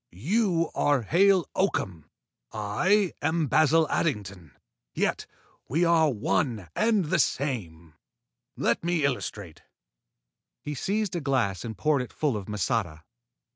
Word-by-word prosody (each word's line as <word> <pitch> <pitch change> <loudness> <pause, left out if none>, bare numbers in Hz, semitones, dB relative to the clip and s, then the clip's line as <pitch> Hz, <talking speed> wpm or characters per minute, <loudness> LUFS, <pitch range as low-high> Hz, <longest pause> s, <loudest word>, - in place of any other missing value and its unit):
You 180 -8 +2
are 145 -4 +1
Hale 185 - +3
Oakham. 95 - -1 0.5
I 175 - +1
am 160 +1 +1
Basil 155 +3 +3
Addington, 95 - -3 0.4
yet - - -1 0.4
we 165 +8 +2
are 165 -2 +4
one 105 - -1
and 215 -5 +2
the 150 - 0
same. 85 - -2 0.6
Let - - 0
me 170 -3 +1
illustrate." 105 - -4 1.0
He 150 - -6
seized 200 +7 -2
a 170 - -2
glass 125 - 0
and 110 -2 -6
poured 150 -3 +1
it 125 - -8
full 145 -6 0
of 100 -3 -5
masata. 100 -6 -2
140 Hz, 125 wpm, -27 LUFS, 105-170 Hz, 1.0 s, are